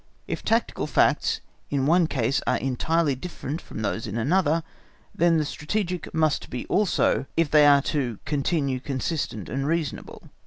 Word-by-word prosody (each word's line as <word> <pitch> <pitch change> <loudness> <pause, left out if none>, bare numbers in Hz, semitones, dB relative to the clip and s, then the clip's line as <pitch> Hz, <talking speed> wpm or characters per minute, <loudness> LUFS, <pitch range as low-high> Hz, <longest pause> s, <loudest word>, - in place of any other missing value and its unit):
If - - -4
tactical - - 0
facts - - +2 0.3
in 135 -2 0
one 170 +2 +4
case 135 -3 0
are - - +3
entirely 150 +4 +1
different 155 +1 -6
from 110 - -7
those 115 +2 -2
in 105 +2 -4
another, 160 +5 +2 0.5
then 170 0 +3
the 155 - +1
strategic, 180 +3 -3
must 155 -2 0
be 125 - -4
so - - -16
also, 200 -8 +2
if 165 -3 +2
they 150 -1 +7
are 140 -1 +6
to 125 -7 -1
continue 140 -2 0
consistent 135 - -3
and 135 +3 -2
reasonable. 160 -3 -3
145 Hz, 160 wpm, -25 LUFS, 130-165 Hz, 0.5 s, they